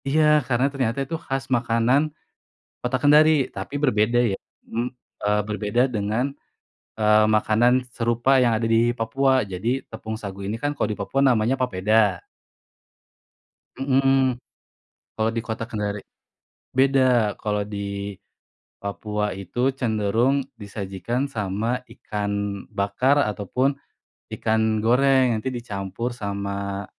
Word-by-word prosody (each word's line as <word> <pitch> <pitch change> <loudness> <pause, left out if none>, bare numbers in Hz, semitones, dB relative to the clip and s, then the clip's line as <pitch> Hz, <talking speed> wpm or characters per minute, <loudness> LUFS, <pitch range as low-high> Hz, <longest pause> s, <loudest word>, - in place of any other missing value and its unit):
Iya. 150 +3 +3 0.3
Karena 125 0 +2
ternyata 125 -4 -1
itu 165 - -4
khas 135 0 -2
makanan 120 +3 +2 0.8
Kota 125 +1 0
Kendari, 150 +2 +6 0.2
tapi, - - -6
berbeda, 120 -2 +3
ya - - -3 0.3
hmm, 120 +2 -2 0.4
eee, 105 0 +2
berbeda 105 +2 0
dengan, 105 +4 0 0.7
eee, 105 0 +5
makanan 110 +3 +3 0.2
serupa 120 +2 +1
yang 120 -2 +3
ada 115 - 0
di 115 +1 +4
Papua. 135 +4 +1 0.2
Jadi, 95 +6 -2 0.2
tepung 110 0 -6
sagu 100 -3 -7
ini 105 - -2
kan 145 - 0
kalau - - -1
di 105 - -4
Papua 135 +7 -1
namanya 120 -1 +3
papeda. 105 -3 +2 1.6
Mhm. 135 -1 +3 0.8
Kalau 110 0 +1
di 115 - -1
kota 115 0 -4
Kendari 105 -2 -4 0.7
beda, 130 -5 +3
kalau 105 -1 -1
di 100 -1 -5 0.7
Papua 105 +1 -3
itu 120 +8 -1
cenderung 120 +3 +1
disajikan 100 +4 -3
sama 110 0 -2
ikan 100 -3 -4
bakar, 100 +8 +1
ataupun 105 +7 0 0.6
ikan 110 0 +1
goreng, 130 +1 +4
nanti 110 +4 -3
dicampur 115 -1 -4
sama 100 -2 -4
110 Hz, 120 wpm, -23 LUFS, 105-125 Hz, 1.6 s, Kendari